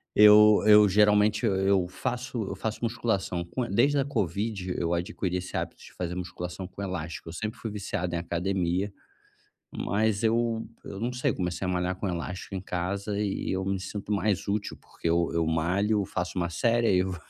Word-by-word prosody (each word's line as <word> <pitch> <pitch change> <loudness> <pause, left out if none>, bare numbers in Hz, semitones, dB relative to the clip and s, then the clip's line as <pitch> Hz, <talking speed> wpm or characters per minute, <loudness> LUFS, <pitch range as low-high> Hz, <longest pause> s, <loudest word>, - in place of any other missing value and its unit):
Eu 105 0 +8
eu 105 -1 +8
geralmente, 105 +2 +4
e - - +4 0.2
eu 95 -3 +3
faço 120 +4 -3
eu 100 - -4
faço 110 +3 -3
musculação 110 -6 -1
com 120 +8 -3
desde 135 +8 +3
a 135 - +1
Covid, 100 - -2
eu 85 0 0
adquiri 90 +1 -2
esse 90 0 -4
hábito - - -4
de - - -14
fazer 90 -1 -4
musculação 90 0 -5
com 100 - -10
elástico, 85 -4 -5
eu - - -8
sempre 110 +5 -4
fui 115 - -4
viciado 95 -3 -3
em - - +1
academia, 90 +2 -1 0.9
mas 105 +2 0
eu 115 0 +1 0.2
eu 100 - -7
não 120 +2 -1
sei, 125 - 0
comecei 90 +1 -3
a - - -2
malhar 90 +1 0
com 100 - -3
elástico 90 +3 -5
em 95 - -2
casa, 100 +3 -3
e 100 -2 -2
eu 95 0 -1
me 95 0 -1
sinto 100 +2 -6
mais 100 -1 0
útil, 105 +1 -2
porque 85 - -5
eu 85 0 +2
eu 85 -1 +1
malho, 95 +6 +1
faço 90 +1 -3
1 85 -1 0
série, 115 +7 +2
aí 95 - +4
eu 95 0 -1
vo 90 - -7
100 Hz, 195 wpm, -27 LUFS, 90-105 Hz, 0.9 s, Eu